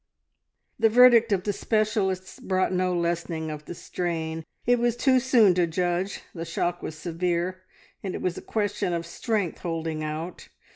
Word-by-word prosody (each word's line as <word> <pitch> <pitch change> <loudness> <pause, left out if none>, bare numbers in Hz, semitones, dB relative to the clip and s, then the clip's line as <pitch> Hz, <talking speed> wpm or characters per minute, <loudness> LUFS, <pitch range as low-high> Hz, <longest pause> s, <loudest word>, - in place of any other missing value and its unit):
The 225 0 +5
verdict 235 -1 +7
of 190 -3 +2
the 205 - -1
specialists 210 -4 -1
brought 185 0 0
no 185 0 +1
lessening 170 -2 -2
of 150 0 -7
the 175 - -7
strain. 165 -2 -3 0.2
It 245 0 +4
was 240 -1 +2
too 260 0 +4
soon 240 -7 +5
to 175 -1 +2
judge; 175 +3 -1
the 165 - -5
shock 175 +1 -2
was 155 - -6
severe, 175 +2 -2 0.4
and 190 -2 -4
it - - -5
was 180 -2 0
a - - -7
question 205 -4 -1
of 170 0 -2
strength 205 0 -2
holding 160 -2 -3
out. 155 +3 -5
180 Hz, 165 wpm, -26 LUFS, 170-210 Hz, 0.4 s, verdict